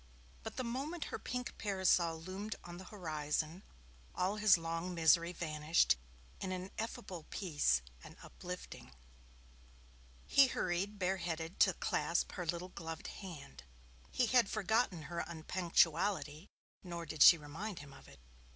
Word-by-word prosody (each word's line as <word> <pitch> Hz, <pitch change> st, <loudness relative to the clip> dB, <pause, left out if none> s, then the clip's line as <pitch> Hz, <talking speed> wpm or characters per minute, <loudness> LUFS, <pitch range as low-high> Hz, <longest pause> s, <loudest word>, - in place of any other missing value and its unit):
but -, -, -7 dB
the 255 Hz, -, -2 dB
moment 275 Hz, +8 st, -3 dB
her -, -, -2 dB
pink 250 Hz, -1 st, -4 dB
parasol 185 Hz, -5 st, +2 dB
loomed 190 Hz, +6 st, -5 dB
on 175 Hz, 0 st, -8 dB
the 190 Hz, -, -9 dB
horizon, 160 Hz, -2 st, -3 dB, 0.5 s
all 185 Hz, +3 st, 0 dB
his 210 Hz, -3 st, +6 dB
long 165 Hz, +2 st, -3 dB
misery 170 Hz, +1 st, +4 dB
vanished 155 Hz, -, +2 dB, 0.4 s
in 190 Hz, -, -3 dB
an 185 Hz, +1 st, -4 dB
ineffable 215 Hz, -7 st, -5 dB
peace 145 Hz, -, +1 dB, 0.2 s
and -, -, -11 dB
uplifting. 180 Hz, -, -8 dB, 1.3 s
He 275 Hz, -1 st, +6 dB
hurried, 195 Hz, -1 st, -1 dB
bare 190 Hz, 0 st, 0 dB
headed, 165 Hz, -1 st, -4 dB
to -, -, +5 dB
clasp -, -, 0 dB
her 180 Hz, -3 st, -5 dB
little 175 Hz, +2 st, -2 dB
gloved 165 Hz, -3 st, -7 dB, 0.2 s
hand. 150 Hz, -, -9 dB, 0.5 s
He 250 Hz, -, +2 dB
had 240 Hz, -2 st, +4 dB
forgotten 215 Hz, -4 st, +1 dB
her 170 Hz, +4 st, -5 dB
unpunctuality, 170 Hz, 0 st, +1 dB, 0.4 s
nor 170 Hz, -2 st, -5 dB
did 155 Hz, -2 st, -6 dB
she 170 Hz, -, +11 dB
remind 165 Hz, +7 st, -6 dB
him 145 Hz, -1 st, -10 dB
of -, -, -15 dB
it. 70 Hz, -, -15 dB
175 Hz, 140 wpm, -35 LUFS, 160-195 Hz, 1.3 s, she